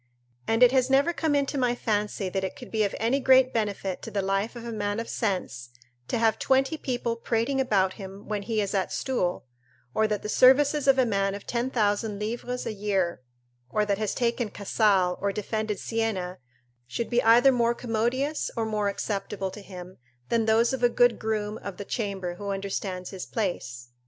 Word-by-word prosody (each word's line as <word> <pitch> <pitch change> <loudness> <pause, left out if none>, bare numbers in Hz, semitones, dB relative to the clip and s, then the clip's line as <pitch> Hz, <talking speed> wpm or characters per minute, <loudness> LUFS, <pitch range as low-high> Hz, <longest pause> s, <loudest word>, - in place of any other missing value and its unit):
And 225 +2 +4
it 250 - +7
has 260 -1 +2
never 280 +6 +3
come 320 -3 0
into 280 0 0
my 245 -1 +2
fancy 210 -3 -1
that 190 +1 -2
it 190 - -3
could 250 - -11
be 220 -1 +1
of 200 - -1
any 235 +5 +1
great 260 -1 +5
benefit 200 -4 -2
to - - -7
the 200 -1 -2
life 195 +4 -1
of 235 -1 -8
a 235 - -4
man 205 -1 -2
of 230 - -4
sense 180 - -2 0.4
to - - -1
have 225 -1 +2
twenty 270 +3 +2
people 245 -5 -2
prating 230 +4 0
about 195 -7 +2
him 195 +1 -9
when 210 -1 -2
he 220 +1 -1
is 200 0 -2
at 195 -2 0
stool; 185 - -1 0.5
or 220 - +2
that 210 -2 -2
the - - -3
services 280 +5 +5
of 270 -1 +6
a 260 - +4
man 195 -3 0
of 200 - -9
ten 240 +1 -1
thousand 210 -3 0
livres 240 +4 -4
a - - -3
year, 195 -6 -1 0.5
or 210 +6 +1
that 200 -1 0
has 215 -2 -1
taken 240 -1 0
Casale 200 -3 +2
or 200 - +1
defended 215 +1 -2
Siena, 195 -6 -2 0.5
should 235 - -4
be 240 0 +3
either 240 +4 +6
more 235 -2 +2
commodious 245 +6 -1
or 225 - 0
more 210 -2 -1
acceptable 195 -1 -3
to 210 - -10
him, 185 -2 -10 0.3
than 230 -1 +2
those 230 +3 +3
of 265 - -2
a 245 - +5
good 245 0 +3
groom 215 -1 -2
of 200 -3 -7
the 205 - -6
chamber 195 -6 -3
who 200 +1 -5
understands 195 -2 -3
his 190 -2 -7
place. 130 - -3
215 Hz, 200 wpm, -27 LUFS, 195-240 Hz, 0.5 s, it